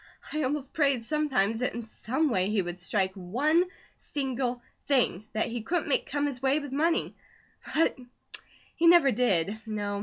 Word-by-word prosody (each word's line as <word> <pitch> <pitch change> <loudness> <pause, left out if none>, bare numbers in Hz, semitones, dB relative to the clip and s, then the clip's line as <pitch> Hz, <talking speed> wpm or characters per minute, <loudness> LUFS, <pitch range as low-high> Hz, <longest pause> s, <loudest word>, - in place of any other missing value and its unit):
I 310 - 0
almost 280 0 -2
prayed 275 -6 +2
sometimes 260 -8 +1
that 250 - -1
in 235 - -4
some 260 +6 -1
way 185 -2 +1
he 210 -3 +1
would 175 +1 -6
strike 190 +1 0
ONE 265 - +1 0.3
SINGLE 260 -3 -2 0.3
THING 235 -7 +1
that 220 - +1
he 235 0 -4
couldn't 330 +7 -1
make 275 - +1
come 290 +1 -1
his 270 -4 -3
way 270 +2 +3
with 290 -3 -5
money; 325 +5 +1 0.6
but 325 +1 +3 0.8
he 335 - +3
never 335 -5 +7
did. 210 -3 +1
No. 205 -2 -3
255 Hz, 170 wpm, -28 LUFS, 215-295 Hz, 0.8 s, never